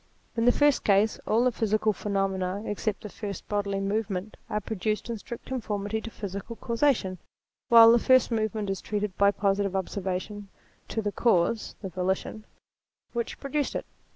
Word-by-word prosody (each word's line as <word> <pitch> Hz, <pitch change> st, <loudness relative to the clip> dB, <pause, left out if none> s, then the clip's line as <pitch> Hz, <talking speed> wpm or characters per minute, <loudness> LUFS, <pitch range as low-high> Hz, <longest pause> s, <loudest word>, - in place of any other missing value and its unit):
In 230 Hz, 0 st, +1 dB
the 245 Hz, -, +7 dB
first 290 Hz, +1 st, +3 dB
case, 205 Hz, +2 st, +3 dB
all 225 Hz, +3 st, +3 dB
the 255 Hz, -, +3 dB
physical 215 Hz, -1 st, +1 dB
phenomena 195 Hz, -1 st, -1 dB
except 210 Hz, 0 st, -2 dB
the -, -, -5 dB
first 200 Hz, -2 st, -6 dB
bodily 200 Hz, -1 st, -1 dB
movement 200 Hz, 0 st, -2 dB
are 210 Hz, -, 0 dB
produced 215 Hz, +2 st, -2 dB
in 230 Hz, -, -4 dB
strict 235 Hz, +3 st, -8 dB
conformity 215 Hz, -4 st, -3 dB
to 230 Hz, -, -6 dB
physical 200 Hz, +1 st, -6 dB
causation; 230 Hz, -, 0 dB, 0.5 s
while 230 Hz, -1 st, +9 dB
that 235 Hz, -, +5 dB
first 255 Hz, +1 st, +4 dB
movement 215 Hz, -2 st, -1 dB
is 195 Hz, -, -4 dB
traced 210 Hz, -2 st, -2 dB
by 200 Hz, 0 st, +6 dB
positive 200 Hz, -1 st, 0 dB
observation, 190 Hz, +2 st, -3 dB, 0.4 s
to 220 Hz, -, -2 dB
the 205 Hz, -, -1 dB
cause 220 Hz, 0 st, +1 dB
(the 190 Hz, -, -3 dB
volition) 190 Hz, +4 st, -2 dB, 0.7 s
which 235 Hz, -1 st, -3 dB
pro 275 Hz, -, -6 dB
REVELATION -, -, -16 dB
229 300 Hz, -, +3 dB
duced -, -, -4 dB
it. -, -, -3 dB
210 Hz, 175 wpm, -27 LUFS, 195-230 Hz, 0.7 s, while